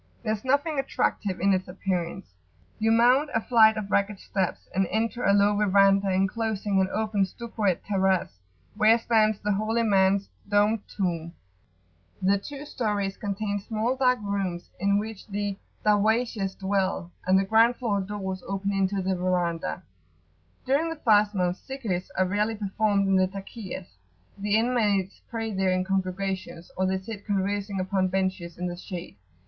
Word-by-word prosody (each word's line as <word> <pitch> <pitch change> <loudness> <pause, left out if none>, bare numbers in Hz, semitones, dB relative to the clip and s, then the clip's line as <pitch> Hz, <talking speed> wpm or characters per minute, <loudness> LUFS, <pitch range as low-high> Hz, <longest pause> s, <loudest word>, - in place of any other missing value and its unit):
There 215 -2 0
is 215 - -5
nothing 285 +3 +1
attractive 205 -7 -1
in 195 +2 +3
its 185 0 -1
appearance. 180 - -3 0.5
You 225 +1 +2
mount 250 +6 +4
a - - +4
flight 220 -1 +5
of 200 -2 -4
ragged 200 0 +1
steps, 190 -3 -3
and 190 0 +1
enter 230 +3 -1
a 200 - +4
low 205 +1 +4
verandah 195 -1 +4
enclosing 200 +1 0
an 190 - +1
open 215 -2 0
stuccoed 210 -2 -2
terrace, 190 - 0 0.4
where 215 +2 +5
stands 220 -2 +2
the 210 - -1
holy 215 +3 0
man's 195 -2 +3 0.2
domed 205 +2 +3
tomb: 170 -4 -3 0.9
the 195 +1 +2
two 285 +6 -8
stories 205 -7 -2
contain 205 0 -3
small 225 +4 -1
dark 250 -1 +3
rooms 195 -4 -3
in 200 +2 +2
which 215 0 -5
the 205 -1 -2 0.3
Darwayshes 210 -1 +1
dwell, 190 -3 -1 0.2
and 185 +1 +5
the 195 - +2
ground 225 +4 +4
floor 210 -6 -1
doors 190 -1 -4
open 195 0 -2
into 195 0 0
the 190 +1 0
[p.86]verandah. 175 - -1 0.8
During 285 +5 +1
the 325 - -4
fast 210 -7 +3
month, 180 -1 0
Zikrs[FN#24] 225 -10 -3
are 185 - +3
rarely 210 +4 0
performed 205 -1 0
in 195 -1 +3
the 185 0 +3
Takiyahs: 195 - -8 0.4
the 205 +1 +1
inmates 215 -5 +1
pray 225 -2 -3
there 190 -1 +1
in 185 0 +1
congregations, 190 -2 -3
or 185 0 +1
they 190 0 0
sit 205 +1 -8
conversing 200 0 -1
upon 185 0 +1
benches 185 -2 -2
in 180 - -3
the 175 -1 -3
shade. 180 -1 -8
200 Hz, 160 wpm, -26 LUFS, 190-220 Hz, 0.9 s, flight